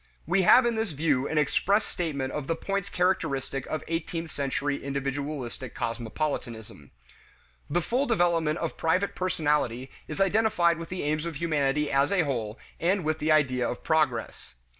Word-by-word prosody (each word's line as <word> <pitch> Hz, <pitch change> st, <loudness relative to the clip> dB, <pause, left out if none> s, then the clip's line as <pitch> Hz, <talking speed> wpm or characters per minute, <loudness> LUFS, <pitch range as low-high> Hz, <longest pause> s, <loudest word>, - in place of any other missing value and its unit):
We 185 Hz, +3 st, +2 dB
have 240 Hz, +7 st, +7 dB
in 240 Hz, -, +2 dB
this 220 Hz, -6 st, -2 dB
view 145 Hz, -2 st, +1 dB
an 160 Hz, -, -2 dB
express 200 Hz, +8 st, +2 dB
statement 140 Hz, -6 st, -3 dB
of 145 Hz, -2 st, -4 dB
the 165 Hz, -, 0 dB
points 195 Hz, +3 st, -3 dB
characteristic 140 Hz, -8 st, 0 dB
of 155 Hz, -, -3 dB
the 165 Hz, -, -7 dB
eighteenth 165 Hz, 0 st, -3 dB
century 140 Hz, +1 st, -2 dB
individualistic 140 Hz, -2 st, -4 dB
cosmopolitanism. 115 Hz, -, -4 dB, 0.8 s
The 175 Hz, -, +1 dB
full 260 Hz, -, 0 dB
development 170 Hz, -7 st, +2 dB
of 165 Hz, -2 st, -3 dB
private 185 Hz, +5 st, +1 dB
personality 145 Hz, -8 st, 0 dB, 0.2 s
is 155 Hz, -, -6 dB
identified 195 Hz, -4 st, +3 dB
with 165 Hz, -, -7 dB
the 185 Hz, -, -4 dB
aims 155 Hz, +2 st, -1 dB
of 165 Hz, -, -5 dB
humanity 150 Hz, -2 st, 0 dB
as 140 Hz, +1 st, +3 dB
a 195 Hz, -4 st, +3 dB
whole 115 Hz, -6 st, -3 dB, 0.2 s
and 185 Hz, +2 st, +1 dB
with 155 Hz, 0 st, -1 dB
the 155 Hz, +1 st, +1 dB
idea 130 Hz, -5 st, +3 dB
of 120 Hz, -, -6 dB
progress. 125 Hz, -, 0 dB
155 Hz, 160 wpm, -27 LUFS, 135-175 Hz, 0.8 s, have